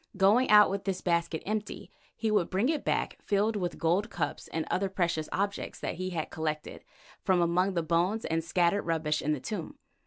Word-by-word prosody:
Going 210 Hz, +7 st, +4 dB
out 210 Hz, -2 st, +7 dB
with 195 Hz, 0 st, -3 dB
this 190 Hz, -2 st, -1 dB
basket 170 Hz, -2 st, 0 dB
empty, 210 Hz, 0 st, -4 dB, 0.2 s
he 220 Hz, -1 st, -1 dB
would 205 Hz, -5 st, +2 dB
bring 200 Hz, +8 st, +1 dB
it 310 Hz, -2 st, 0 dB
back -, -, -1 dB
filled 210 Hz, +2 st, +1 dB
with 180 Hz, -4 st, -2 dB
gold 180 Hz, +7 st, +1 dB
cups 145 Hz, -8 st, -3 dB
and 160 Hz, -1 st, -3 dB
other 195 Hz, +1 st, 0 dB
precious 170 Hz, -4 st, -1 dB
objects 200 Hz, +1 st, -2 dB
that -, -, -3 dB
he 185 Hz, +1 st, -4 dB
had 165 Hz, -4 st, -4 dB
collected 155 Hz, -1 st, -4 dB, 0.4 s
from 185 Hz, -3 st, +3 dB
among 180 Hz, +3 st, +2 dB
the 170 Hz, -, +1 dB
bones 175 Hz, +7 st, +1 dB
and 165 Hz, 0 st, -1 dB
scattered 175 Hz, +4 st, +2 dB
rubbish 155 Hz, -2 st, 0 dB
in 150 Hz, -, 0 dB
the 150 Hz, -, -3 dB
Tomb. 185 Hz, -, -5 dB
185 Hz, 195 wpm, -29 LUFS, 165-205 Hz, 0.4 s, out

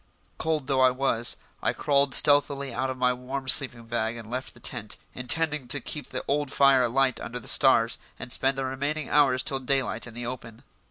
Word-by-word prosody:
Cold 155 Hz, -3 st, -1 dB
though 130 Hz, -1 st, +2 dB
it 130 Hz, -, -1 dB
was, 120 Hz, -3 st, 0 dB, 0.2 s
I -, -, 0 dB
crawled 140 Hz, -1 st, +1 dB
stealthily 140 Hz, -2 st, +3 dB
out 130 Hz, +3 st, -2 dB
of 130 Hz, -, -5 dB
my 125 Hz, 0 st, +2 dB
warm 130 Hz, +2 st, -6 dB
sleeping 125 Hz, -2 st, +4 dB
bag 115 Hz, 0 st, -2 dB
and 115 Hz, -1 st, -10 dB
left 130 Hz, +1 st, -5 dB
the -, -, -16 dB
tent, -, -, -2 dB, 0.2 s
intending 150 Hz, +2 st, -1 dB
to 145 Hz, -, 0 dB
keep 145 Hz, +3 st, -7 dB
the -, -, -6 dB
old 145 Hz, -1 st, -1 dB
fire 140 Hz, -2 st, +4 dB
alight 130 Hz, +2 st, +1 dB
under 125 Hz, +1 st, -6 dB
the -, -, -11 dB
stars -, -, +4 dB, 0.2 s
and 125 Hz, -, -8 dB
spend 135 Hz, +2 st, 0 dB
the 135 Hz, -, -2 dB
remaining 140 Hz, +3 st, -3 dB
hours 135 Hz, -3 st, +3 dB
till 135 Hz, -, +1 dB
daylight 135 Hz, -1 st, -1 dB
in 115 Hz, -, -12 dB
the 120 Hz, 0 st, -6 dB
open. 120 Hz, -1 st, -8 dB
130 Hz, 205 wpm, -26 LUFS, 125-140 Hz, 0.2 s, sleeping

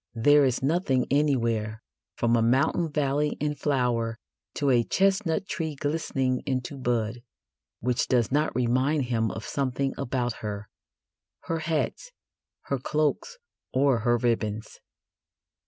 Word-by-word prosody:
There 145 Hz, +5 st, +5 dB
is 130 Hz, 0 st, 0 dB
nothing 140 Hz, -4 st, +1 dB
anywhere, 115 Hz, -6 st, +1 dB, 0.3 s
from 120 Hz, 0 st, +2 dB
a 115 Hz, -, +3 dB
mountain 135 Hz, +8 st, +2 dB
valley 145 Hz, 0 st, 0 dB
in 150 Hz, 0 st, 0 dB
flower 125 Hz, -6 st, 0 dB, 0.4 s
to 140 Hz, -2 st, +1 dB
a 120 Hz, -2 st, +4 dB
chestnut 190 Hz, -, +1 dB
tree 165 Hz, -6 st, -3 dB
glistening 135 Hz, -3 st, -1 dB
into 130 Hz, +1 st, -2 dB
bud, 120 Hz, -1 st, -1 dB, 0.6 s
which 125 Hz, +1 st, 0 dB
does 120 Hz, -3 st, +2 dB
not 150 Hz, 0 st, +1 dB
remind 130 Hz, +4 st, +2 dB
him 115 Hz, -3 st, 0 dB
of 110 Hz, -, -6 dB
something 135 Hz, 0 st, -1 dB
about 120 Hz, -1 st, -1 dB
her 105 Hz, -1 st, -5 dB, 0.7 s
her 165 Hz, 0 st, -2 dB
hats, 160 Hz, -, -2 dB, 0.5 s
her 140 Hz, -, -2 dB
cloaks, 155 Hz, -, -1 dB, 0.4 s
or 135 Hz, -2 st, +3 dB
her 120 Hz, +2 st, +2 dB
ribbons. 110 Hz, -2 st, -2 dB
130 Hz, 125 wpm, -27 LUFS, 120-150 Hz, 0.7 s, There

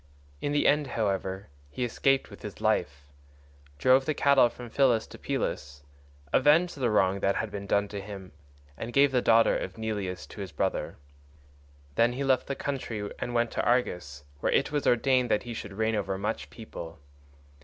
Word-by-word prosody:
In 145 Hz, -, -1 dB
the 145 Hz, -, +1 dB
end, 150 Hz, -1 st, +3 dB
however, 100 Hz, -4 st, -2 dB, 0.2 s
he 125 Hz, -, -4 dB
escaped 135 Hz, +3 st, +1 dB
with -, -, -12 dB
his -, -, -8 dB
life, 70 Hz, +1 st, 0 dB, 0.7 s
drove 130 Hz, -, +4 dB
the 155 Hz, -, 0 dB
cattle 140 Hz, -4 st, +5 dB
from 120 Hz, 0 st, -10 dB
Phylace 125 Hz, -5 st, +3 dB
to -, -, -11 dB
Pylos, 70 Hz, +1 st, -3 dB, 0.5 s
avenged 155 Hz, +6 st, +4 dB
the 130 Hz, -4 st, 0 dB
wrong 100 Hz, -2 st, +2 dB
that 100 Hz, 0 st, +1 dB
had 110 Hz, -2 st, -2 dB
been 100 Hz, 0 st, -6 dB
done 100 Hz, 0 st, +2 dB
him, 100 Hz, -2 st, -8 dB, 0.4 s
and 115 Hz, +8 st, -6 dB
gave 140 Hz, 0 st, +5 dB
the 125 Hz, -2 st, +2 dB
daughter 115 Hz, -1 st, +4 dB
of -, -, -4 dB
Neleus 100 Hz, -8 st, -3 dB
to 105 Hz, -, -8 dB
his 95 Hz, -3 st, -6 dB
brother. 75 Hz, -, -2 dB, 1.0 s
Then 115 Hz, +8 st, +3 dB
he 135 Hz, +3 st, -3 dB
left 130 Hz, -2 st, +2 dB
the 140 Hz, -, -2 dB
country 115 Hz, -8 st, -4 dB
and 120 Hz, -, -4 dB
went 115 Hz, -1 st, +1 dB
to -, -, -1 dB
Argos, 90 Hz, -, 0 dB, 0.2 s
where -, -, 0 dB
it -, -, +2 dB
was 145 Hz, -2 st, -1 dB
ordained 125 Hz, +1 st, +3 dB
that 105 Hz, -, +1 dB
he 120 Hz, -, -6 dB
should 105 Hz, -3 st, -7 dB
reign 110 Hz, +2 st, 0 dB
over 100 Hz, -2 st, -1 dB
much 105 Hz, +3 st, -3 dB
people. 85 Hz, -7 st, -9 dB
115 Hz, 180 wpm, -28 LUFS, 100-130 Hz, 1.0 s, cattle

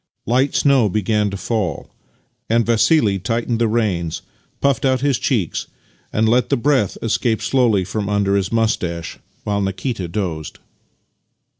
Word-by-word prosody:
Light 130 Hz, +4 st, +1 dB
snow 135 Hz, -7 st, +4 dB
began 105 Hz, +1 st, 0 dB
to 100 Hz, -, -5 dB
fall, 100 Hz, -7 st, -3 dB, 0.6 s
and 115 Hz, 0 st, +3 dB
Vassili 115 Hz, -2 st, +3 dB
tightened 115 Hz, +3 st, -1 dB
the 115 Hz, -, +3 dB
reins, 100 Hz, -8 st, -1 dB, 0.4 s
puffed 140 Hz, -3 st, +1 dB
out 130 Hz, -2 st, +2 dB
his 140 Hz, -3 st, +1 dB
cheeks, 105 Hz, -, -1 dB, 0.4 s
and 110 Hz, +1 st, +1 dB
let 120 Hz, +3 st, +2 dB
the -, -, +2 dB
breath 125 Hz, -5 st, +1 dB
escape 115 Hz, -1 st, 0 dB
slowly 120 Hz, -7 st, +2 dB
from 100 Hz, +2 st, -3 dB
under 100 Hz, -1 st, +1 dB
his 100 Hz, -1 st, 0 dB
moustache, 90 Hz, -7 st, -1 dB, 0.2 s
while 100 Hz, -1 st, -1 dB
Nikita 95 Hz, +1 st, -3 dB
dozed. 85 Hz, -5 st, -4 dB
110 Hz, 140 wpm, -19 LUFS, 100-120 Hz, 0.6 s, snow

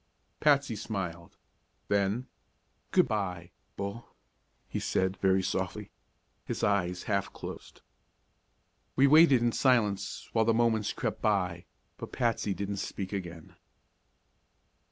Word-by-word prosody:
Patsy 140 Hz, -5 st, +3 dB
smiled. 90 Hz, -6 st, -5 dB, 0.5 s
Then: 100 Hz, +5 st, +1 dB, 0.6 s
"Good 180 Hz, -5 st, +4 dB
by 90 Hz, -6 st, -3 dB, 0.3 s
Bull," 100 Hz, +4 st, -6 dB, 0.5 s
he -, -, -3 dB
said 95 Hz, 0 st, 0 dB
very 95 Hz, -1 st, +2 dB
softly. -, -, -3 dB, 0.5 s
His -, -, -4 dB
eyes 90 Hz, -3 st, +1 dB
half 100 Hz, -2 st, -1 dB
closed. -, -, -9 dB, 1.1 s
We 135 Hz, -, +5 dB
waited 140 Hz, -4 st, +6 dB
in 120 Hz, -, +3 dB
silence 105 Hz, -7 st, +1 dB
while 110 Hz, -1 st, +3 dB
the 115 Hz, 0 st, +3 dB
moments 115 Hz, -2 st, +2 dB
crept -, -, -3 dB
by, 90 Hz, -5 st, 0 dB, 0.3 s
but -, -, -8 dB
Patsy 115 Hz, -5 st, 0 dB
didn't 100 Hz, 0 st, -3 dB
speak 95 Hz, 0 st, -4 dB
again. 85 Hz, -4 st, -6 dB
100 Hz, 115 wpm, -30 LUFS, 95-115 Hz, 1.1 s, waited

